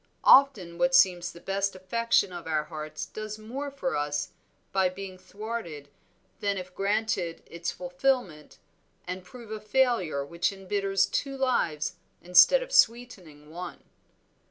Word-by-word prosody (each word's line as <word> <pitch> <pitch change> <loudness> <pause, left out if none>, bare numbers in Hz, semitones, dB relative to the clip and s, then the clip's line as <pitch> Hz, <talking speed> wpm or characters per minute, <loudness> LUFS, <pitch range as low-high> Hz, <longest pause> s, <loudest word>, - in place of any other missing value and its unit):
Often 210 -12 +5
what 265 0 +3
seems 180 -6 +4
the 170 - -13
best 195 +1 -1
affection 195 +1 +1
of 175 -2 -8
our 155 -1 0
hearts 155 -1 -6
does 215 0 -7
more 255 +7 -5
for 275 -1 -3
us 145 0 -1 0.4
by 190 -1 +2
being 190 0 -8
thwarted 185 -7 -7 0.5
than 200 -1 -1
if 185 0 -7
granted 195 -4 -1
its 170 0 -5
fulfilment 180 - -2 0.5
and 180 +1 -5
prove 230 +3 -12
a 215 - -4
failure 210 - +1
which 170 +6 -1
embitters 195 0 0
two 275 -1 -3
lives 180 - 0 0.2
instead 180 - +6
of - - -11
sweetening 200 - +1
one." 175 +1 -8
195 Hz, 135 wpm, -28 LUFS, 170-230 Hz, 0.5 s, instead